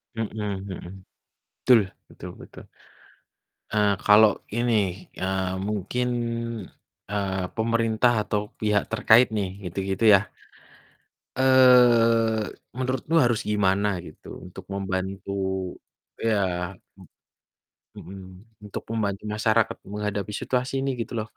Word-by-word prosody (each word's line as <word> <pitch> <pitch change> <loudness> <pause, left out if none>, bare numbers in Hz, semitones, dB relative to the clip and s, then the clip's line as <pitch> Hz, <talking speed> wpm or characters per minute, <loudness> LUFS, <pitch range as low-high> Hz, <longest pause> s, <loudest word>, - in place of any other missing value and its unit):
Mhm 115 -1 -2 0.4
mhm. 95 +1 -9 0.6
Betul 115 -7 +5 0.2
betul - - -10
betul. - - -13 1.1
Eee, 105 -1 +3
kalau 105 0 +7 0.2
ini, 120 0 +1 0.5
eee, 95 0 -1
mungkin, 105 +4 -2 1.0
eee, 95 -3 -2
pemerintah 115 +1 +2
atau 105 0 -1 0.2
pihak 105 -1 +2
terkait 115 +3 +5
nih 95 -2 -1 0.2
gitu-gitu 95 +4 -3
ya. 100 +2 +3 1.1
Eee, 120 -4 +5 0.3
menurutmu 130 +5 -1
harus 120 -6 +2
gimana 100 -1 +1 0.2
gitu 75 - -14 0.2
untuk 90 +1 -10
membantu 95 0 -3 0.9
iya 95 -5 0 1.2
m - - -11
mhm, 95 0 -10 0.4
untuk 100 - -6
membantu 105 -3 -2
masyarakat 110 +1 +1 0.2
menghadapi 105 0 -3
situasi 125 0 -1
ini 135 - 0
gitu 115 - -6
loh? 110 - -2
105 Hz, 100 wpm, -25 LUFS, 95-115 Hz, 1.2 s, kalau